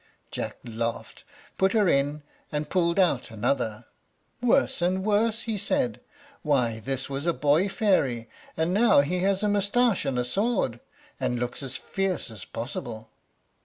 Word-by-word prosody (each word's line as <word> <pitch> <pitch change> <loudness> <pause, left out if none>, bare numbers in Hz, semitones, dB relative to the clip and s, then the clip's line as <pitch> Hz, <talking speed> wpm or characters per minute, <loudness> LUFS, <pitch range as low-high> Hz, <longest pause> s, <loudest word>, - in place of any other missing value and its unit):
Jack - - -4
laughed, 115 0 -4 0.4
put 190 0 +3
her 215 -4 +4
in, 145 0 +1 0.3
and 150 0 -3
pulled 170 -1 +2
out 175 -10 +2
another. 115 0 -1 0.6
"Worse 245 -5 +2
and 185 +2 +1
worse," 215 +2 +2
he 220 -3 -2
said; 250 +2 0 0.4
"why, 125 -7 +1
this 135 +3 -3
was 140 +3 -4
a 170 - +3
boy 150 +7 +2
fairy, 135 - +1 0.3
and 160 +3 +1
now 215 -7 +6
he 180 +6 -1
has 195 +2 +1
a - - +3
mustache 205 +2 +2
and 135 -2 -1
a 125 - +1
sword, 195 - 0 0.4
and 125 - 0
looks 125 +3 -3
as 130 -2 -3
fierce 190 -9 -2
as 105 -4 -9
possible!" 115 -2 -6
150 Hz, 155 wpm, -26 LUFS, 125-200 Hz, 0.6 s, now